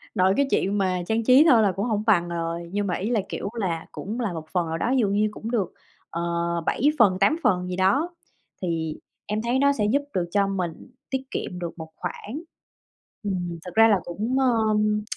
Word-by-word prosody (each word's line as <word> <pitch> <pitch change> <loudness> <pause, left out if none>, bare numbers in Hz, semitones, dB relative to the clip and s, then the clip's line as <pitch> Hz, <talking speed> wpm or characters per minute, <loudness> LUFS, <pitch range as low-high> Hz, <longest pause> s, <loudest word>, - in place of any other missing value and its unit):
Nội 190 -1 +4
cái 280 0 +3
chuyện 200 +2 +1
mà 185 -2 +1
trang 225 +1 +1
trí 260 +6 +7
thôi 240 -5 +6
là 200 - +3
cũng 195 +4 -2
hổng 215 -3 0
bằng 175 -5 +4
rồi, 170 0 -3
nhưng 205 +1 -1
mà 180 - 0
ý 195 +6 -2
là, 235 -3 +2
kiểu - - -4
là, 170 -5 -2
cũng 215 +6 -5
là 220 -7 -1
một 160 -2 -6
phần 175 -3 +1
nào 160 0 -2
đó, 235 - 0
ví 265 - +3
dụ 220 - +3
như 205 +2 +2
cũng 220 +2 -6
được, 210 -7 -1 0.4
ờ, 170 - -4 0.4
7 - - -1 0.2
phần, 195 -5 +5
8 200 +11 +4
phần 180 -2 +2
gì 180 - -3
đó, 195 - +2 0.5
thì 165 -3 -2 0.3
em 210 +1 -2
thấy 240 +3 +1
nó 280 +1 +4
sẽ 215 -6 0
giúp 280 - +3
được 180 -2 0
cho 200 0 +2
mình 185 +1 -4 0.2
tiết 265 -1 -1
kiệm 180 - -4
được 170 -1 -5
một 160 -1 -8
khoản. 215 - -6 0.8
Ừm, 175 -4 -3
thật 180 - -6
ra 225 0 +7
là 205 -4 +4
cũng, 220 +9 -2
ờm, 215 -4 +2
200 Hz, 220 wpm, -25 LUFS, 180-225 Hz, 0.8 s, trí